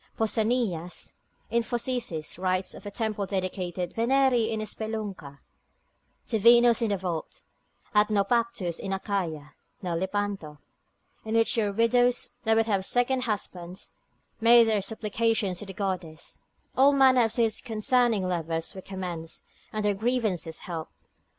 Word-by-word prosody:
Pausanias, 220 -6 -1 0.3
in 235 - +3
Phocicis, 235 -10 -3
writes 185 0 -1
of - - -10
a - - -3
temple 210 -1 -2
dedicated 185 -2 -3
Veneri 245 -1 +3
in 220 -1 -2
spelunca, 210 -10 -5 0.8
to 225 - -1
Venus 235 +2 +6
in 230 - +1
the 200 - +1
vault, 175 -4 -5 0.5
at 210 0 +4
Naupactus 210 -4 0
in 195 - -3
Achaia 180 -7 -3 0.3
(now 175 -2 -2
Lepanto) 190 -3 -2 0.7
in 220 +1 -3
which 225 +3 +3
your 210 -3 +1
widows 245 +3 +2
that 220 0 +4
would 225 0 +3
have 200 -4 0
second 250 +4 +1
husbands, 185 -5 -5 0.5
made 235 +1 +7
their 220 -2 +1
supplications 215 -2 -1
to 210 - -7
the 195 - -7
goddess; 185 -5 -4 0.4
all 275 +2 +6
manner 260 -3 +5
of 225 - -2
suits 225 -2 +1
concerning 230 -1 +1
lovers 165 -2 -2
were 190 - -8
commenced, 180 -4 -6 0.3
and 215 -1 -2
their 205 - +3
grievances 205 -7 -1
helped. 165 -3 -6
210 Hz, 135 wpm, -27 LUFS, 185-230 Hz, 0.8 s, made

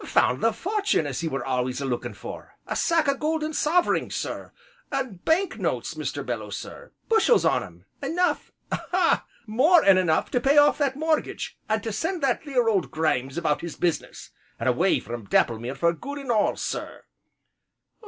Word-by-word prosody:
"Found 125 +2 +2
the 225 - +3
fortun' 400 - 0
as 140 -3 -3
he 165 - -2
were 135 -5 -3
always 125 -1 -1
a 140 - -3
lookin' 125 -2 -3
for, - - -9
a - - -3
sack 330 -3 +2
o' 280 - +4
golden 310 +2 -2
soverings, 340 +4 +1
sir, - - -4 0.4
an' 260 -8 -2
bank 365 +4 +1
notes, - - -2
Mr. - - -4
Belloo, - - -4
sir, - - -8 0.2
bushels 455 +1 +4
on - - +3
'em; - - -12 0.2
enough 355 +2 0 0.2
ah! 360 -1 +1 0.2
more 290 +10 +4
'n 195 -1 +6
enough 160 -4 +1
to 245 - +2
pay 280 +3 +3
off 290 +1 +6
that 275 -2 +1
mortgage, 315 +2 -1
and 215 -1 0
to 225 - -3
send 330 - -2
that 265 +1 +1
theer 260 -6 +1
old 200 -6 +1
Grimes 135 -4 -1
about 160 -3 0
his 170 -2 -6
business, 175 -3 -2 0.3
an' - - -3
away - - +3
from 115 0 -7
Dapplemere 120 +3 +1
for 170 0 +2
good 280 - -7
an' 275 -4 -3
all, 215 -3 +2
sir." - - -5
245 Hz, 180 wpm, -25 LUFS, -, 0.4 s, n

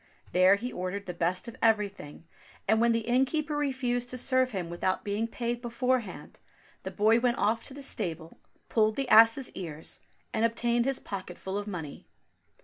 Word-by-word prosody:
There 185 +2 +6
he 245 +5 -5
ordered 185 +2 -4
the 180 - -5
best 175 +5 -1
of 235 - -8
everything, 205 -9 0 0.4
and 220 +2 +3
when 235 0 +4
the 230 0 +1
innkeeper 275 +5 +1
refused 255 -4 -1
to 255 - -3
serve 255 0 +2
him 190 -7 -4
without 175 +2 -1
being 210 +3 -1
paid 235 +1 -3
beforehand, 240 -3 -2 0.4
the - - -5
boy 220 +2 +3
went 240 0 +1
off 225 +2 +1
to 270 - -6
the 280 - -7
stable, 165 - -5 0.3
pulled 215 -1 +2
the 275 -1 -2
ass's 225 +4 +6
ears, 160 -4 -6 0.3
and 220 - 0
obtained 235 +1 +1
his 270 -1 +1
pocket 185 -3 -7
full 190 0 -5
of 205 +1 -3
money. 165 -7 -7
225 Hz, 175 wpm, -29 LUFS, 190-245 Hz, 0.4 s, There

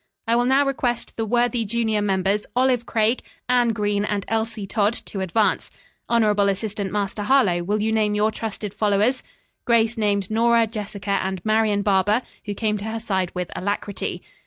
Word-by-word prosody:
"I 230 - +3
will 240 +1 +2
now 270 +3 +4
request 250 -3 -2
the 225 -1 -2
worthy 240 +1 +1
junior 220 -1 0
members 195 +1 0
Olive 250 -2 +2
Craig, 225 +2 +1 0.3
Anne 245 -1 +3
Green 205 -2 0
and 205 -1 -2
Elsie 225 -2 -2
Todd, 205 +2 +1
to 200 - -6
advance. 190 +4 +1 0.4
Honorable 210 -4 +3
Assistant 200 0 -2
Master 205 0 -2
Harlowe, 205 -7 +3
will 205 +4 -1
you 220 - +1
name 215 -1 +1
your 210 +1 +2
trusted 215 -2 -5
followers?" 210 +5 +1 0.4
Grace 230 -1 +2
named 200 -2 0
Nora, 230 +1 +4
Jessica 205 -2 -3
and 190 0 -3
Marian 215 -2 +2
Barber 205 +4 +2 0.2
who 205 -1 -4
came 210 0 -1
to 200 - -6
her 225 +1 -3
side 190 -5 -1
with 180 -1 -3
alacrity. 200 +1 -3
215 Hz, 170 wpm, -23 LUFS, 200-230 Hz, 0.4 s, now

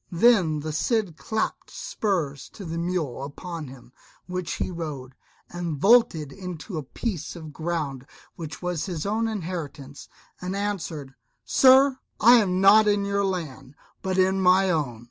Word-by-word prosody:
Then 175 -6 +4
the 155 +1 -4
Cid 200 +1 0
clapt 220 +6 -3
spurs 155 - -2
to 195 - -9
the 165 0 -4
mule 170 -8 -2
upon 140 -4 -8 0.3
which 180 -1 -4
he - - -3
rode, 150 -7 -6 0.3
and 175 -3 -4
vaulted 170 - +4
into 180 -1 -6
a - - -6
piece 175 - -4
of 160 -3 -9
ground 150 -5 -3 0.3
which 160 0 -8
was 175 -2 -2
his 170 -5 -4
own 220 +3 0
inheritance, 165 -9 -6 0.3
and 180 +2 -3
answered, 175 -9 -4 0.3
"Sir, 265 0 +6 0.2
I 240 +3 +8
am 185 -5 +2
not 210 +3 +7
in 205 -1 +2
your 200 0 0
land, 150 -8 -4 0.3
but 190 -1 -2
in 190 +1 +3
my 185 +1 +4
own." 140 -9 -1
175 Hz, 145 wpm, -25 LUFS, 150-200 Hz, 0.3 s, I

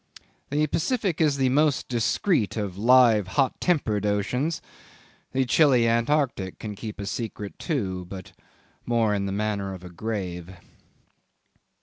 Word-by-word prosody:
The 150 +2 +1
Pacific 185 - -1
is 150 -3 +3
the 130 -1 +2
most 145 +1 +2
discreet 120 - 0
of 100 -4 -3
live, 115 -2 +5
hot 135 -2 +1
tempered 115 - +1
oceans: 115 +10 0 0.7
the 130 0 +1
chilly 125 -3 +4
Antarctic 115 -4 0
can 105 -1 -6
keep 105 +1 -8
a 100 - -4
secret 105 -1 -5
too, 95 - -2
but 95 0 -9 0.5
more 115 -3 +1
in 100 -1 -1
the - - -3
manner 100 -1 -2
of 90 - -12
a 90 - -10
grave. 90 -2 -5
115 Hz, 135 wpm, -25 LUFS, 100-135 Hz, 0.7 s, live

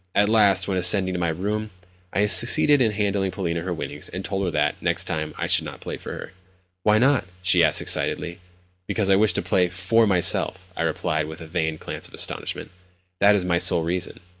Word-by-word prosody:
At 105 0 +3
last, 100 -4 +4
when 95 -2 -1
ascending 95 0 +2
to 90 - -3
my 85 -1 0
own 80 - -4
room, 105 +3 -3 0.4
I 100 +3 +1
succeeded 120 +8 +4
in 115 -3 +2
handing 100 -2 -1
Polina 85 -3 -3
her 90 +2 -5
winnings, 85 - -6
and 95 +1 -7
told 95 0 -3
her 90 - -1
that, 75 -2 -1
next - - 0
time, 75 -1 -4
I - - -2
should - - +4
not - - -9
play - - -6
for - - -9
her. - - -9 0.5
"Why 105 +3 +3
not?" 130 -1 +2 0.2
she 90 -1 +3
asked 80 - +3
excitedly. 85 0 -2 0.5
"Because 100 -1 0
I - - +6
wish 105 -1 +2
to - - -2
play 90 0 +1
for 95 +6 +1
myself," 95 0 +1
I - - -4
replied 80 -1 -1
with 80 +1 -9
a 80 - -9
feigned 80 -2 -3
glance - - -5
of - - -13
astonishment. - - -4 0.5
"That 100 +1 +5
is 95 -3 -1
my 85 -1 +1
sole 85 - +3
reason." 90 +2 -4
95 Hz, 215 wpm, -23 LUFS, 85-105 Hz, 0.5 s, I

